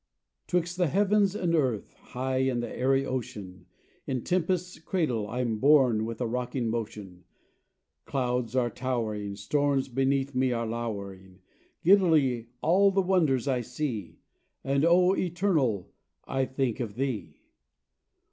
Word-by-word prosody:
'Twixt 180 0 -1
the 180 -2 +2
heavens 200 +3 +2
and 175 -4 0
earth, 130 -9 0
high 130 +1 -4
in 130 -2 +1
the 120 - -4
airy 135 +1 +2
ocean, 100 -8 -6 0.4
In 130 - -1
the 120 - -6
tempest's 180 0 -1
cradle 155 - -1
I'm 120 -2 -2
borne 130 -5 +4
with 115 0 -5
a 125 - -1
rocking 125 0 -2
motion; 105 -5 -5 0.8
Clouds 125 -3 -1
are 120 -2 +1
towering, 110 -6 -3
Storms 140 +6 0
beneath 135 +2 0
me 130 0 +1
are 115 0 -1
lowering, 100 -5 -6 0.4
Giddily 160 - +4 0.2
all 190 +5 +5
the 195 0 +1
wonders 160 -10 +2
I 130 -2 +1
see, 120 - -4 0.5
And, 140 +2 +1
O 180 +2 +5
Eternal, 165 - 0 0.3
I 135 0 0
think 130 -2 -2
of 110 -5 -4
Thee! 110 - -3
130 Hz, 135 wpm, -28 LUFS, 115-160 Hz, 0.8 s, all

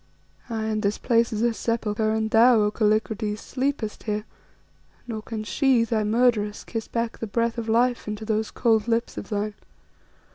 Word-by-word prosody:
Aye, 225 -1 -2
and 215 -1 -1
this 205 0 0
place 235 -1 +2
is 220 0 -1
a 235 -1 +2
sepulchre, 220 -2 -1
and 220 0 0
thou, 235 +1 +6
O 210 0 +2
Kallikrates, 215 0 0
sleepest 260 -4 -3
here, 210 0 -1 0.8
nor 225 -3 -5
can 220 0 -5
she, 245 +4 +2
thy 225 -1 0
murderess, 215 -2 +1
kiss 225 -2 -5
back 230 -1 -3
the 225 - -4
breath 230 +2 0
of 225 -1 -4
life 240 +1 +2
into 210 +1 -4
those 220 0 0
cold 225 -2 +1
lips 230 0 0
of - - -7
thine. 210 0 -2
220 Hz, 175 wpm, -25 LUFS, 215-235 Hz, 0.8 s, thou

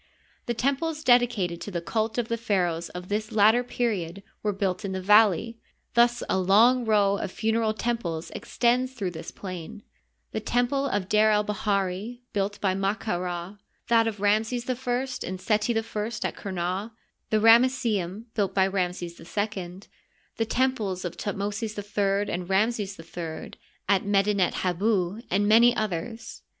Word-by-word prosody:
The 240 - -1
temples 300 +5 -1
dedicated 235 - +3
to - - -5
the 180 -3 -2
cult 220 +6 -2
of 240 -2 0
the 230 - -1
pharaohs 180 -7 -1
of 180 0 -8
this 215 +2 -2
latter 220 +3 +5
period 200 -7 -2 0.2
were 210 - 0
built 195 0 -2
in 195 -1 -3
the 190 - -2
valley 210 +3 +4 0.2
— - - -47
thus 240 0 +3
a 190 - +1
long 230 +7 +4
row 205 -2 +3
of 190 - -4
funereal 220 0 0
temples 215 -9 -3
extends 250 +2 0
through 200 -8 -3
this 160 -1 -7
plain: 185 -4 -8 0.5
the - - -2
temple 260 +3 0
of 200 -7 -1
D6r 215 +2 +4
el 210 0 +2
bahiri, 205 +2 -2
built 200 0 -1
by 190 -2 +1
Ma 195 +2 0
ka 215 -6 -3
Rsl; 180 +2 -5 0.3
that 230 -1 +4
of 215 -2 -3
Ramses 220 +4 +1
I 255 - +1 0.5
and 185 +1 -5
Seti 215 +4 +1
I - - +2
at 225 - -1
Qumah; 205 -3 -3 0.4
tne 215 - +2
Ramesseum, 225 -4 +3
built 200 -3 -1
by 190 -1 +4
Ramses 180 -3 -2
II; 190 0 -4 0.6
the 225 - +1
temples 220 -7 -1
of 175 - -4
Thutmosis 205 +2 -3
III 205 0 0
and 175 +1 -4
Ramses 205 -1 0
III 165 -1 -7 0.4
at 195 -2 +3
Medtnet 200 -2 +2
Habu, 190 +2 0
and 200 +3 +1
many 235 +3 +6
others. 215 +3 -4
205 Hz, 160 wpm, -26 LUFS, 185-230 Hz, 0.6 s, many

